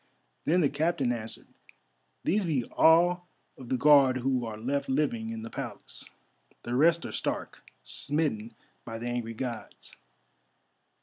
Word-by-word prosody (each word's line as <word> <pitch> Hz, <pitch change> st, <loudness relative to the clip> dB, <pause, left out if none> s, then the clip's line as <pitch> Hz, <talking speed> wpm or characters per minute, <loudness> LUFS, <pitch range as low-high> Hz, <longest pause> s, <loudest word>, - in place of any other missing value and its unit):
Then 175 Hz, +3 st, +3 dB
the 145 Hz, -, +3 dB
Captain 145 Hz, -3 st, 0 dB
answered, 115 Hz, -2 st, -5 dB, 0.8 s
"These 205 Hz, +4 st, +2 dB
be 145 Hz, -7 st, +1 dB
all 175 Hz, +6 st, +4 dB, 0.3 s
of 130 Hz, -4 st, -11 dB
the 130 Hz, -, +1 dB
Guard 135 Hz, -1 st, +6 dB
who 130 Hz, 0 st, 0 dB
are 110 Hz, -1 st, -6 dB
left 135 Hz, +6 st, -2 dB
living 130 Hz, -5 st, 0 dB
in 115 Hz, -1 st, -5 dB
the 115 Hz, -, -6 dB
Palace. -, -, -6 dB, 0.6 s
The 120 Hz, -, -4 dB
rest 165 Hz, +6 st, +4 dB
are -, -, -5 dB
stark, -, -, -3 dB, 0.2 s
smitten 120 Hz, -7 st, -1 dB, 0.3 s
by 115 Hz, -1 st, -6 dB
the 115 Hz, -, -6 dB
angry 120 Hz, -2 st, -3 dB
Gods." 120 Hz, -1 st, -6 dB
130 Hz, 140 wpm, -29 LUFS, 115-155 Hz, 0.8 s, Guard